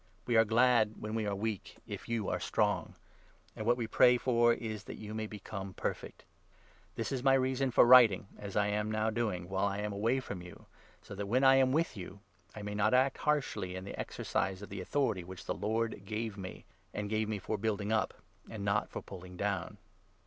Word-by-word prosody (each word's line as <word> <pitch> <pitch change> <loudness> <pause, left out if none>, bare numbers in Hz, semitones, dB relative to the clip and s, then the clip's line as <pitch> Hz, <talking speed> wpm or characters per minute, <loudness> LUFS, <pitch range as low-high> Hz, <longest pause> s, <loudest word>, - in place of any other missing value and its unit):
We 120 - +1
are 110 0 +6
glad 115 -1 +4
when 105 0 -5
we 110 -2 -1
are 100 - -1
weak, 105 0 -4
if - - -7
you 115 -4 -1
are - - -1
strong. - - 0 0.6
And 110 - -5
what 120 - +6
9 - - -16
we 120 - -2
pray 125 +2 +5
for 120 -1 +3
is 110 -3 -3
that - - -8
you 105 0 -7
may 110 0 -3
become 100 -2 -7
perfect. - - -5 0.7
This 115 - -3
is 130 -2 -1
my 135 +1 +4
10 135 - +4
reason 130 +1 0
for 120 - +6
writing 120 -6 +7
as 100 -1 -7
I 105 - +3
am 105 +1 -1
now 110 0 0
doing, 105 -6 -2
while 95 +1 0
I 100 0 -2
am 105 0 -3
away 115 +6 +1
from 100 -8 -6
you, 90 0 -12 0.4
so - - -10
that, 100 0 -4
when 125 +6 +2
I 135 0 +7
am 130 -1 +4
with 160 -1 +1
you, 95 0 -8 0.4
I 105 - -7
may 105 0 -4
not 110 +3 +2
act 130 +1 +3
harshly 135 -11 0
in 95 - -5
the 100 - -7
exercise 95 +1 -2
of - - -9
the 100 -1 -5
authority 105 -3 0
which 90 +1 -10
the - - -1
Lord 110 +3 -1
gave 110 +1 -3
me 95 -3 -8
— - - -37
arid 105 0 -2
gave 110 0 0
me 110 - -1
for 105 +2 -3
building 105 -1 -1
up 110 -2 +1 0.3
and 105 -3 -5
not 100 +1 +1
for - - -6
pulling 90 -1 -10
down. 100 -3 -2
110 Hz, 225 wpm, -32 LUFS, 100-120 Hz, 0.7 s, writing